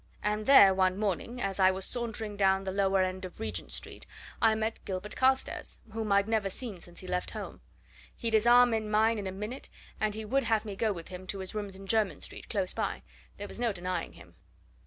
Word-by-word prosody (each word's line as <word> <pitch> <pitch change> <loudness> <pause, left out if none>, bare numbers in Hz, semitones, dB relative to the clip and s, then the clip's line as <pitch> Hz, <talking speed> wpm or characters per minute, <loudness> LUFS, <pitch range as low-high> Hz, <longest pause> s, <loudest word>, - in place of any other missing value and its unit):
And 210 +1 -1
there, 200 -9 +9
one 185 0 +2
morning, 215 +4 -2
as 195 -3 -2
I 185 -1 +7
was 190 0 -1
sauntering 225 -3 -2
down 195 -1 +3
the 190 - -3
lower 195 -1 +2
end 185 +1 -3
of 185 +2 -8
Regent 225 - -4
Street, - - -7 0.3
I 225 -2 +5
met 220 +1 -2
Gilbert 190 +1 -5
Carstairs, 265 0 +1 0.2
whom 220 -2 -2
I'd 200 +1 +4
never 220 -3 +1
seen 210 -2 -6
since 175 +1 -11
he 185 - -10
left 180 0 -2
home. - - -7 0.5
He'd 230 -1 -3
his 220 +1 +4
arm 245 0 +7
in 215 -1 -1
mine 220 +1 +3
in 200 - -4
a - - -3
minute, 210 +7 -6 0.3
and 215 -1 0
he 220 0 -5
would 270 +4 +1
have 225 -1 +1
me 205 -2 -5
go 220 +2 +1
with 170 -4 -7
him 185 0 -8
to 195 - -3
his 190 -1 -6
rooms 205 -2 -4
in 195 +1 -10
Jermyn 215 -1 +1
Street, - - -7
close 195 -4 0
by - - -2 0.3
there 205 - -6
was - - -8
no 240 -2 +1
denying 180 -2 -3
him. - - -15
205 Hz, 225 wpm, -30 LUFS, 190-225 Hz, 0.5 s, there